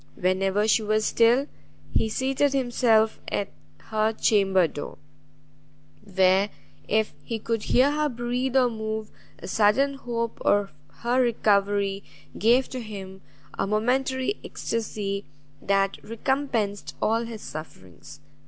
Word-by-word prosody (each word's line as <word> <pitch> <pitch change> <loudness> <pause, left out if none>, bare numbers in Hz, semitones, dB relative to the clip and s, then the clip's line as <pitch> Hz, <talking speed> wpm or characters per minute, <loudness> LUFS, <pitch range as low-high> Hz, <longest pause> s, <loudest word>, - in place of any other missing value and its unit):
Whenever 195 +2 +1
she 220 - +4
was 215 0 +1
still, 235 +4 +4 0.5
he 220 - +2
seated 270 +4 +1
himself 240 -4 +2
at 200 -1 -1 0.3
her 215 0 0
chamber 195 -5 +3
door, 145 - -7 1.1
where, 190 0 +3 0.4
if 215 0 +1
he 230 - -3
could 225 0 -3
hear 265 +3 +4
her 300 0 0
breathe 245 +1 -2
or 255 -1 +5
move, 220 -1 -4 0.3
a - - -9
sudden 225 +8 +3
hope 235 -4 -4
of 205 -1 +2 0.3
her 245 +2 +2
recovery 200 -4 +1 0.3
gave 240 +5 +3
to 255 - -6
him 190 -3 -8 0.4
a - - +1
momentary 260 - 0
extasy 205 -3 -3 0.4
that 195 0 0
recompensed 230 -3 -2
all 225 +2 +1
his 225 -2 -8
sufferings. 145 - -10
220 Hz, 120 wpm, -25 LUFS, 200-245 Hz, 1.1 s, or